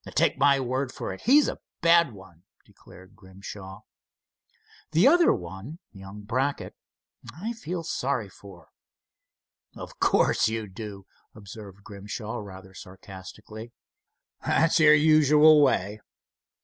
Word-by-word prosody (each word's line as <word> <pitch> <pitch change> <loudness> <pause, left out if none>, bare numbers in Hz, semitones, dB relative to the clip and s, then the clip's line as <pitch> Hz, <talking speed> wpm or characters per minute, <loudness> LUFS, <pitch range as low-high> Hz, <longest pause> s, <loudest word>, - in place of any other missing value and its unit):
"Take - - +1
my 140 -1 +4
word 130 +1 -3
for 95 - -6
it, 95 - -12
he's 280 +5 +5
a - - -5 0.2
bad 170 -3 +4
one," 95 -5 -16 0.2
declared 95 +1 -18
Grimshaw. 95 0 -11 1.1
"The 170 +10 +5
other 345 +4 +5
one—young 95 - -9
Brackett—I 140 - -6
feel 180 -6 -6
sorry 130 -7 -2
for." 95 -4 -16 1.1
"Of - - -11
course - - +2
you 110 -1 -4
do," 100 0 -9 0.3
observed 100 -2 -12
Grimshaw, 105 +3 -7
rather 95 -2 -11
sarcastically; 100 +5 -12 0.7
"that's 165 +1 +2
your 150 -1 +7
usual 155 0 +5
way. 105 -6 0
110 Hz, 110 wpm, -25 LUFS, 95-150 Hz, 1.1 s, your